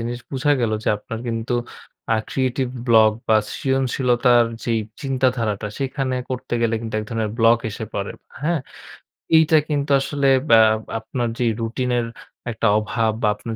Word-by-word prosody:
জিনিস 120 Hz, +1 st, -3 dB
বুঝা 140 Hz, +2 st, +2 dB
গেল 115 Hz, -2 st, +1 dB
যে -, -, +1 dB
আপনার 115 Hz, +1 st, -7 dB
কিন্তু 115 Hz, +1 st, -2 dB, 0.6 s
আ -, -, +2 dB
ক্রিয়েটিভ 130 Hz, -1 st, 0 dB, 0.2 s
ব্লক 110 Hz, -2 st, +6 dB, 0.2 s
বা 110 Hz, -, +6 dB, 0.2 s
সৃজনশীলতার 125 Hz, -2 st, +2 dB, 0.2 s
যেই 115 Hz, -2 st, +1 dB, 0.2 s
চিন্তাধারাটা 125 Hz, -6 st, 0 dB
সেখানে 135 Hz, -1 st, -2 dB
করতে 125 Hz, -1 st, -3 dB
গেলে 115 Hz, 0 st, +2 dB
কিন্তু 115 Hz, -1 st, -6 dB
এক 105 Hz, -, -6 dB
ধরনের 110 Hz, -2 st, -1 dB
ব্লক 115 Hz, +1 st, +5 dB
এসে 110 Hz, +2 st, -5 dB
পড়ে। 100 Hz, 0 st, -3 dB, 0.3 s
হ্যাঁ? 165 Hz, -1 st, +1 dB, 0.8 s
এইটা 160 Hz, 0 st, +5 dB
কিন্তু 145 Hz, -1 st, -1 dB
আসলে 140 Hz, 0 st, 0 dB, 0.2 s
এ্যা 115 Hz, -1 st, +8 dB, 0.4 s
আপনার 120 Hz, +1 st, -3 dB
যে 120 Hz, -, +1 dB, 0.2 s
রুটিন 125 Hz, +3 st, -2 dB
এর 115 Hz, -, -1 dB, 0.5 s
একটা 115 Hz, 0 st, 0 dB
অভাব 110 Hz, 0 st, 0 dB
বা -, -, +4 dB
আপনার 110 Hz, +2 st, -6 dB
120 Hz, 155 wpm, -21 LUFS, 115-130 Hz, 0.8 s, এ্যা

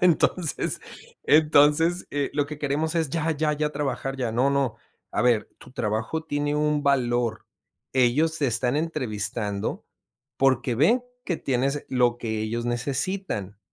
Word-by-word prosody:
Entonces, 175 Hz, -2 st, +1 dB, 0.4 s
entonces, 155 Hz, +3 st, +4 dB
eh 145 Hz, -1 st, -1 dB
lo 145 Hz, -1 st, +1 dB
que 150 Hz, 0 st, -7 dB
queremos 150 Hz, +3 st, -1 dB
es: 165 Hz, -3 st, +1 dB
"Ya, 165 Hz, 0 st, 0 dB
ya, 155 Hz, 0 st, +1 dB
ya 150 Hz, 0 st, -1 dB
trabajar 135 Hz, -2 st, -3 dB
ya". 125 Hz, -4 st, -2 dB
No, 125 Hz, +4 st, +2 dB
no, 140 Hz, -4 st, 0 dB, 0.4 s
a -, -, +1 dB
ver, 120 Hz, -3 st, +2 dB
tu -, -, -14 dB
trabajo 110 Hz, +8 st, -2 dB
tiene 145 Hz, -1 st, -1 dB
un 150 Hz, 0 st, +1 dB
valor. 120 Hz, -5 st, +1 dB, 0.5 s
Ellos 140 Hz, +6 st, +2 dB
te 145 Hz, -, +1 dB
están 120 Hz, +2 st, +1 dB
entrevistando, 110 Hz, -9 st, -2 dB, 0.5 s
porque 130 Hz, -2 st, +2 dB
ven 200 Hz, -, +3 dB, 0.2 s
que 175 Hz, -, -1 dB
tienes 135 Hz, +2 st, -1 dB
lo 125 Hz, -2 st, +2 dB
que 110 Hz, -2 st, -3 dB
ellos 115 Hz, +2 st, -2 dB
necesitan, 125 Hz, -, -2 dB
140 Hz, 145 wpm, -25 LUFS, 120-155 Hz, 0.5 s, entonces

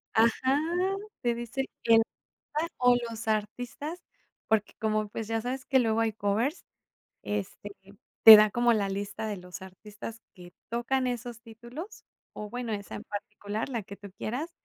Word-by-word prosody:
¡Ajá! 260 Hz, +5 st, +3 dB, 0.6 s
Te 240 Hz, -2 st, +2 dB
dice 240 Hz, +3 st, -3 dB, 0.2 s
el 225 Hz, -1 st, +7 dB, 0.3 s
artista 330 Hz, +3 st, -4 dB
o 245 Hz, -1 st, +5 dB
los 225 Hz, 0 st, -6 dB
artistas, 245 Hz, +10 st, -3 dB, 0.5 s
porque 220 Hz, -2 st, +2 dB
como, 215 Hz, -1 st, 0 dB
pues 215 Hz, +1 st, -5 dB
ya 225 Hz, 0 st, 0 dB
sabes 255 Hz, +1 st, -4 dB
que 265 Hz, -, +4 dB
luego 225 Hz, -2 st, +2 dB
hay 225 Hz, -1 st, +1 dB
covers, 220 Hz, -, 0 dB, 0.6 s
este, 205 Hz, 0 st, -4 dB, 0.5 s
te 220 Hz, -1 st, +14 dB
da 210 Hz, 0 st, +6 dB
como 240 Hz, +2 st, +3 dB
la 205 Hz, -3 st, +1 dB
lista 200 Hz, +2 st, -4 dB
de 210 Hz, -, -3 dB
los 180 Hz, +1 st, -9 dB
artistas 210 Hz, +4 st, -9 dB
que 175 Hz, -2 st, -13 dB, 0.2 s
tocan 255 Hz, +2 st, 0 dB
esos 240 Hz, -2 st, -4 dB
títulos, 245 Hz, -, -10 dB, 0.3 s
o 210 Hz, 0 st, -6 dB
bueno, 245 Hz, 0 st, -4 dB
esa 200 Hz, -2 st, -5 dB
en -, -, -6 dB
particular, 205 Hz, +2 st, -5 dB
la 235 Hz, -5 st, -3 dB
que 200 Hz, +1 st, -10 dB
tú 200 Hz, -1 st, -11 dB
quieras. 260 Hz, -, -3 dB
225 Hz, 160 wpm, -29 LUFS, 210-245 Hz, 0.6 s, te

